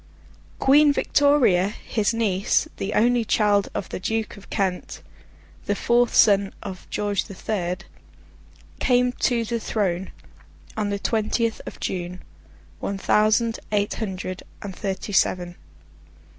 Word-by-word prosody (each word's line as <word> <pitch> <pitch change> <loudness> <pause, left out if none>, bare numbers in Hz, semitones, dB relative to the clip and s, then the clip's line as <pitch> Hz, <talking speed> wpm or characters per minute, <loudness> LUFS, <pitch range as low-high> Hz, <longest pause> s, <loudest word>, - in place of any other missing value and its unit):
Queen 290 +2 +5
Victoria, 280 -11 +3
his 210 +1 -1
niece, 210 -4 +1
the 195 +2 -3
only 240 +2 +3
child 205 -2 +2
of - - -3
the - - -5
Duke 220 +3 -2
of 200 - -15
Kent, 190 -3 -2 0.6
the 205 - +1
fourth 240 +3 +2
son 200 -2 +4
of 190 -2 -8
George 205 -2 -1
the 195 - -10
Third, 180 -3 -3 0.9
came 250 -1 +3
to 240 -2 0
the 235 +1 -2
throne 190 -5 -1 0.7
on 210 -2 -1
the 200 - -1
twentieth 225 +2 0
of - - -8
June, 180 0 -4 0.6
one 200 - -3
thousand 215 +3 +2
eight 205 -1 +1
hundred 185 -3 -4 0.2
and 195 -2 -6
thirty 195 +2 -4
seven. 175 -2 +1
205 Hz, 130 wpm, -24 LUFS, 190-230 Hz, 0.9 s, Queen